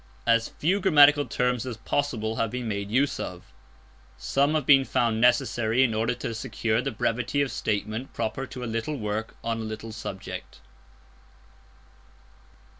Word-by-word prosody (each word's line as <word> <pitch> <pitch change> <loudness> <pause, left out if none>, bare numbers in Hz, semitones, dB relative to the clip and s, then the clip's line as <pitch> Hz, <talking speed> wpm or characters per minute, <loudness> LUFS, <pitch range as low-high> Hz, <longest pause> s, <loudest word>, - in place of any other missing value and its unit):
As 115 0 +3
few 185 +7 0
grammatical 145 -6 +6
terms 125 -2 0
as 125 -3 -5
possible 115 -4 -2
have 115 - 0
been 125 +1 -4
made 100 -2 -3
use 135 +6 +1
of. 90 -1 -7 0.6
Some 140 +3 +1
have 155 -4 0
been 135 -1 +6
found 115 -3 0
necessary 120 0 +3
in 120 -4 +1
order 115 +3 0
to 120 -2 -4
secure 110 -1 -1
the 135 - -2
brevity 125 +3 -1
of 140 - -3
statement 110 +4 -3
proper 115 +4 -3
to 125 - -7
a - - -3
little 115 +6 -3
work 110 -1 -3
on 115 0 -2
a - - -4
little 110 +1 -6
subject. 110 -3 -7
115 Hz, 155 wpm, -26 LUFS, 110-135 Hz, 0.6 s, grammatical